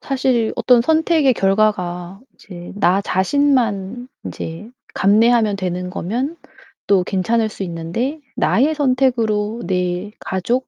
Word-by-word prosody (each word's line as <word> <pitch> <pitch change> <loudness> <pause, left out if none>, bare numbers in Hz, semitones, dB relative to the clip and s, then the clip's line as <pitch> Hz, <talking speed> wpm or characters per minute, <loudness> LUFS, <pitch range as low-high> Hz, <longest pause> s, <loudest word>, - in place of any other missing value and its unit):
사실 255 -4 0
어떤 250 -2 +4
선택의 320 -2 +3
결과가 195 -3 0
이제 175 -3 -11
나 195 -1 +2
자신만 240 0 0 0.2
이제 170 +8 -7 0.2
감내하면 215 +1 +3
되는 180 -1 -3
거면 245 - -3 0.5
또 195 -3 +4
괜찮을 220 +5 0
수 195 - -6
있는데 180 - -3 0.2
나의 290 +7 +2
선택으로 240 -6 +1
내 180 +2 -2
가족, 235 +8 -2
215 Hz, 240 characters per minute, -19 LUFS, 185-250 Hz, 0.5 s, 어떤